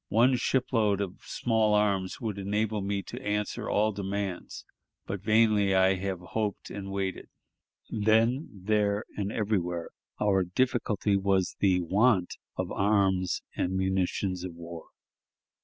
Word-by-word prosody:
One 120 +4 +4
ship 125 +1 0
load 105 -4 +3
of 95 -3 -4
small 110 -3 +1
arms 100 -3 +1
would 110 -4 -3
enable 105 +2 -1
me 100 0 -2
to - - -8
answer 105 0 -2
all 110 +1 +2
demands, 100 -2 -4 0.4
but 100 -1 -4
vainly 110 -1 +4
have 95 -1 +2
I - - -12
hoped 105 -2 -2
and 100 -1 -6
waited." 95 -1 -3 0.6
Then, 115 +6 +2
there, 105 +1 0
and 100 0 -2
everywhere, 90 -6 -1 0.3
our 95 -2 +3
difficulty 105 0 0
was 95 -1 +1
the 95 -2 +3
want 95 +2 +2 0.2
of - - -2
arms 95 -2 +1
and 95 +1 -1
munitions 95 -1 0
of 90 -2 -6
war. 85 -1 -9
100 Hz, 135 wpm, -28 LUFS, 95-110 Hz, 0.6 s, One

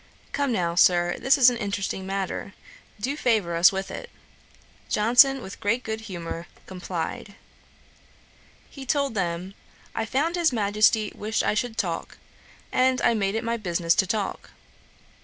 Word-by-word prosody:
'Come 280 -2 0
now, 175 -6 0
Sir, 175 0 +4
this 270 +2 +4
is 255 -2 +7
an 240 - -4
interesting 195 -3 -3
matter; 195 0 -4 0.4
do 260 +7 -2
favour 215 - +1
us 170 +3 +6
with 195 0 -4
it.' 485 - -7 0.8
Johnson, 250 +5 +4
with 190 - -9
great 235 +5 0
good 220 0 -4
humour, 170 -4 -6 0.2
complied. 185 +2 -5 1.4
He 275 - -9
told 280 -1 0
them, 180 -1 -3 0.4
'I - - -2
found 320 +9 0
his 340 -3 +3
Majesty 215 0 +2
wished 215 +2 -2
I - - +1
should 225 +1 -2
talk, 230 - -3 0.5
and 255 0 +2
I - - +4
made 200 -2 0
it 225 - -2
my 230 0 -1
business 170 -5 +1
to 190 - +2
talk. 205 0 -3
215 Hz, 150 wpm, -25 LUFS, 190-245 Hz, 1.4 s, is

